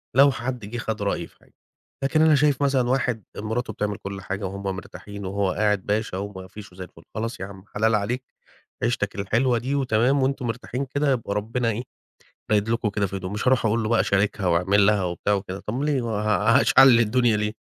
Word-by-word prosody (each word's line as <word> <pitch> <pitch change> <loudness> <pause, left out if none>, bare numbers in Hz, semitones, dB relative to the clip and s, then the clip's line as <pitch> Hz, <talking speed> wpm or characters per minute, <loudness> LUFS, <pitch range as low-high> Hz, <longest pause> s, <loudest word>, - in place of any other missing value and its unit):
لو 140 +2 +7
حد 125 -2 -4
جه 115 +4 -6
خد 110 -2 -3
رأيي 100 -4 -1
في - - -28
حاجة، - - -26 0.5
لكن 155 +3 +2
أنا 160 -1 +6
شايف 145 -1 +2
مثلًا 135 -3 +2
واحد 125 -4 0
مراته 110 +3 -3
بتعمل 105 -1 -2
كلّ 100 0 -7
حاجة 100 +1 -4
وهُم 100 +1 -5
مرتاحين 100 +1 -9
وهو 100 0 0
قاعد 105 -1 0
باشا 105 -2 -1
وما 95 -1 -6
فيش 105 +1 -11
وزي 95 +1 -8
الفل، 85 -2 -14
خلاص 115 +2 -3
ياعم 95 0 -8
حلال 110 +1 +2
عليك 115 +5 -1 0.6
عيشتك 115 -4 0
الحلوة 115 +5 +1
دي 130 +4 -2
وتمام 130 +1 +2
وأنتم 135 -1 -1
مرتاحين 125 +3 -3
كده 145 +2 0
يبقى 115 -6 -1
ربنا 115 +3 -1
إيه، 115 +3 -4 0.7
رايد 105 0 +2
لكم 115 -1 0
كده 100 0 0
في 95 - -5
هدوء، 95 -1 -5
مش 105 +4 -1
هاروح 130 -3 +3
أقول 115 +2 +1
له 110 - -1
بقى 115 0 +3
شاركها 100 0 0
وأعمل 95 +4 +3
لها 105 -2 +3
وبتاع 90 +3 0
وكده، 100 -1 -4
طب 120 +6 -3
ليه، 145 -3 +1
ه 105 0 +2
هشعلل 125 -3 +6
الدنيا 120 0 +3
ليه؟ 105 0 -1
110 Hz, 205 wpm, -24 LUFS, 100-125 Hz, 0.7 s, لو